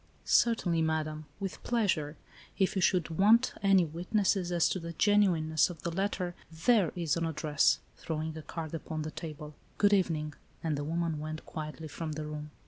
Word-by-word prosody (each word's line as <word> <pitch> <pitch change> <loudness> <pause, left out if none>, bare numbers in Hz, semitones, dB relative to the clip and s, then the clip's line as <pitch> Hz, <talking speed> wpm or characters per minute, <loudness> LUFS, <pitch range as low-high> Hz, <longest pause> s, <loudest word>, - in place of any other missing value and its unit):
" - - -33
Certainly, 185 -8 +3
madam, 155 -1 -1
with 195 -2 -5
pleasure. 175 -11 0 0.4
If 190 -1 +1
you 190 - +1
should 175 -2 +2
want 225 +5 +5
any 195 -3 +5
witnesses 180 +3 0
as 170 -2 +3
to 185 - -1
the 170 0 -6
genuineness 170 -6 +3
of 170 -3 -9
the 170 - -2
letter, 185 -1 -1 0.2
there 175 +2 +3
is 170 -4 0
an 165 - 0
address," 150 -2 +2 0.2
throwing 160 0 -4
a 160 - -6
card 160 0 -6
upon 160 -1 -4
the 155 - -5
table. 150 -2 -7
" - - -33
Good 205 0 +4
evening," 160 -6 +1 0.3
and 160 -2 0
the 145 - -3
woman 165 0 -1
went 155 +1 -6
quietly 155 0 -6
from 155 +1 -5
the 155 0 -4
room. 150 0 -6
165 Hz, 185 wpm, -31 LUFS, 155-185 Hz, 0.4 s, want